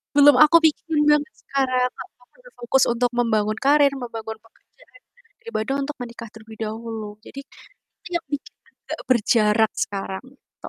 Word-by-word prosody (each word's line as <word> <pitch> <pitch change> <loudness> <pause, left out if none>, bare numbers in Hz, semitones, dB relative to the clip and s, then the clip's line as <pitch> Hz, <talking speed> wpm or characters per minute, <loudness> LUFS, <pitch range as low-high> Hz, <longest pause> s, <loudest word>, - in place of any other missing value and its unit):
belum 290 -1 +7
aku 335 +3 +6
pikirin 310 0 +1
banget 295 -1 +1
sekarang, 255 -2 0
Kak, 255 - -8 0.2
aku - - -24 0.2
berfokus 265 - 0
untuk 245 +1 0
membangun 215 -2 +1
karir, 285 0 +5
membangun 225 -3 -6
pekerjaan - - -24 0.4
daripada 270 - -3
untuk 295 +2 -5
menikah 235 -2 -8
terlebih 220 0 -13
dahulu, 220 -1 -6 0.2
jadi, 275 - -9 0.6
itu - - -12
yang - - -17
bikin 285 - -5 0.2
agak - - -8
berjarak 220 -2 +3
sekarang, 195 0 -4
gitu. - - -15
245 Hz, 145 wpm, -22 LUFS, 220-280 Hz, 0.6 s, belum